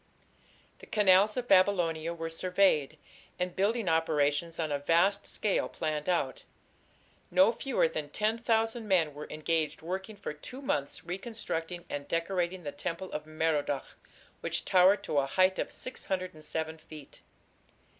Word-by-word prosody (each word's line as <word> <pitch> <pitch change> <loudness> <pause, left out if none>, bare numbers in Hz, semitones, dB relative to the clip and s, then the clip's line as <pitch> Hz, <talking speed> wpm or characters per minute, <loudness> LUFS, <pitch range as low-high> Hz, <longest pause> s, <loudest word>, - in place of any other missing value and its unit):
The - - -13
canals 205 +1 +4
of 245 -1 -2
Babylonia 175 -5 +3
were 165 -1 -4
surveyed, 180 -4 +2 0.4
and 180 0 -2
building 210 +2 +1
operations 160 0 +1
on 160 -2 -2
a 145 - 0
vast 185 +7 +2
scale 210 -3 0
planned 155 0 -3
out. 340 - 0 0.9
No 280 -4 +5
fewer 245 -5 +1
than 155 -2 -5
ten 215 +7 0
thousand 225 -1 0
men 170 -6 +2
were 150 +1 -8
engaged 155 0 -1
working 190 +5 -4
for 200 -6 -5
two 200 - -9
months 145 - -2
reconstructing 175 -3 -4
and 145 0 -5
decorating 175 +1 -1
the 145 - -4
temple 170 +5 -5
of 150 0 -5
Merodach, 155 -3 -1 0.4
which - - -2
towered 190 +2 +5
to 145 - +1
a 135 - 0
height 185 +5 +3
of - - -2
607 160 -8 -4
feet. 155 -2 -12
175 Hz, 140 wpm, -30 LUFS, 155-200 Hz, 0.9 s, No